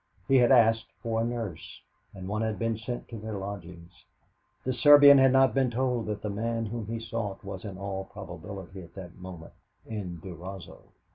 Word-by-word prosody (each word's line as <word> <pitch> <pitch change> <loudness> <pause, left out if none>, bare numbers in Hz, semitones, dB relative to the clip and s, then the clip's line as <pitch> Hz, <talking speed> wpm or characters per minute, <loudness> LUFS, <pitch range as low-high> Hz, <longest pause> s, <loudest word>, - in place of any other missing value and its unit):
He 135 - +5
had 120 0 +5
asked 115 -2 +5 0.2
for 115 -1 0
a - - +1
nurse, 115 -9 -5 0.4
and 95 -1 -7
one 105 +2 -2
had 110 -2 -1
been 115 +2 0
sent 120 +3 -6
to 115 - -7
their 110 -1 -5
lodgings. 90 -4 -8 0.6
The 130 - -1
Serbian 145 +2 +8
had 135 -1 +6
not 135 0 +5
been 135 -2 +2
told 120 -2 -1
that 105 -1 -4
the 105 - -2
man 115 +2 -2
whom 110 0 -5
he 115 +1 -3
sought 110 -3 -4
was 95 -2 -7
in 100 -3 -6
all 95 0 -4
probability 95 0 -9
at 85 -1 -14
that 90 -3 -9
moment 90 -3 -10 0.3
in 95 -6 -5
Durazzo. 90 +2 -9
105 Hz, 190 wpm, -28 LUFS, 95-115 Hz, 0.6 s, Serbian